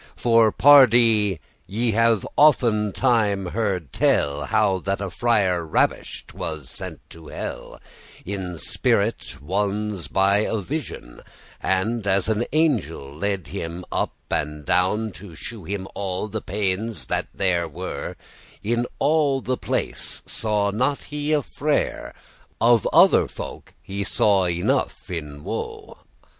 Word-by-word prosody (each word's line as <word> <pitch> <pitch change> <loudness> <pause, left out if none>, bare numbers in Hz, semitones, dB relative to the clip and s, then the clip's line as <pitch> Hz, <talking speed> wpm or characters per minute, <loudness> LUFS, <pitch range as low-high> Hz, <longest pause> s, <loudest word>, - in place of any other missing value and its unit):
For, 115 -2 +4
pardie, 115 - +6 0.3
ye 115 +5 0
have 115 -1 +2
often 115 -8 +4
time 105 -5 +1
heard 95 - -2
tell, 70 0 +1
How 100 -3 +2
that 95 +2 -2
a 100 -2 -4
friar 100 -8 +1
ravish'd 80 - -1
was 75 -4 -6 0.3
to 80 -2 -13
hell - - -7 0.5
In 95 -3 -4
spirit 70 -2 -1
ones 100 +2 -2
by 100 +1 +3
a 110 - 0
visioun, 120 - -6 0.4
And, 100 +3 0
as 95 +1 +2
an 110 +2 +1
angel 95 - 0
led 95 -2 -2
him 85 0 -5
up - - -1 0.2
and 75 0 -2
down, 105 +7 +1
To 90 -2 -11
shew 105 +3 -8
him 95 0 -4
all 95 +1 -3
the 105 - -4
paines 100 +3 -2
that - - -2
there 90 -3 0
were, 75 - -6 0.5
In 120 +3 0
all 145 -3 +2
the 130 0 -2
place - - -2
saw 105 -2 -1
he 100 - -6
not 130 +4 0
a 150 0 0
frere; 150 +3 -2 0.4
Of 115 -2 +4
other - - +6
folk - - -9
he 100 +1 -4
saw 100 -2 +2
enough 85 +1 -1
in 75 -4 -6
woe. - - -6
100 Hz, 130 wpm, -23 LUFS, 90-115 Hz, 0.5 s, pardie